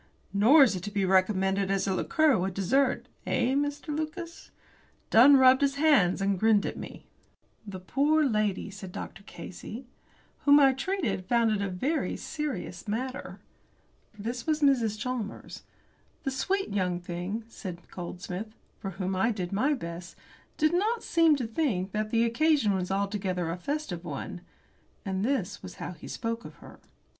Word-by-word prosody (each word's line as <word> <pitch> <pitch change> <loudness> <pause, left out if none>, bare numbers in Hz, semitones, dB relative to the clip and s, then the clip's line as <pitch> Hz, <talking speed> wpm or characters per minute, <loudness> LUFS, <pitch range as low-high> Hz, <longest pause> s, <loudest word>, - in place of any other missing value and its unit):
"Nor 240 +10 +7
is 230 -7 +3
it 180 - -4
to 205 - -5
be 200 -2 0
recommended 190 +1 +2
as 195 -1 +1
a 195 - 0
liqueur 305 +8 +3
with 190 -1 -1
dessert 260 +8 +1 0.2
eh, 250 +1 +1
Mr. 290 +2 -1
Lucas?" 335 +2 -6 0.6
Dunn 270 +5 +8
rubbed 260 0 +6
his 280 -1 +2
hands, 275 - +3
and 195 -1 +1
grinned 215 -1 +4
at - - -3
me. - - -9 0.6
"The 190 -2 -6
poor 290 +11 +2
lady," 215 -5 0
said 190 -2 -9
Dr. 175 - -7
Casey, 200 +7 -9 0.5
"whom 285 0 +6
I 270 -2 +6
treated 255 - -2
found 235 -2 +3
it 210 -2 0
a 200 - -1
very 265 - -1
serious 300 -6 -5
matter." 255 +5 -4 0.8
This 235 +5 -5
was 310 -1 +1
Mrs. 240 -7 +3
Chalmers. 235 -2 -5 0.6
"The 270 - -1
sweet 390 +9 -1
young 180 -3 -1
thing," 180 +5 -4
said 180 -6 -8
Goldsmith, 180 +4 -6 0.2
"for 195 - -4
whom 190 -1 -2
I 195 +6 +2
did 185 -5 -4
my 265 +9 +2
best, 170 -5 -7 0.4
did 310 +2 +2
not 435 +6 +1
seem 330 -3 +4
to 260 -4 -2
think 220 - -1
that 215 0 -2
the 230 +1 +2
occasion 235 -2 +2
was 185 -1 -2
altogether 195 -3 -1
a - - -2
festive 280 - -3
one," 165 +2 -6 0.6
and 190 0 -2
this 215 -6 -1
was 185 -1 -9
how - - -6
he 175 - -11
spoke 230 0 -4
of - - -11
her. - - -14
220 Hz, 165 wpm, -28 LUFS, 190-280 Hz, 0.8 s, Dunn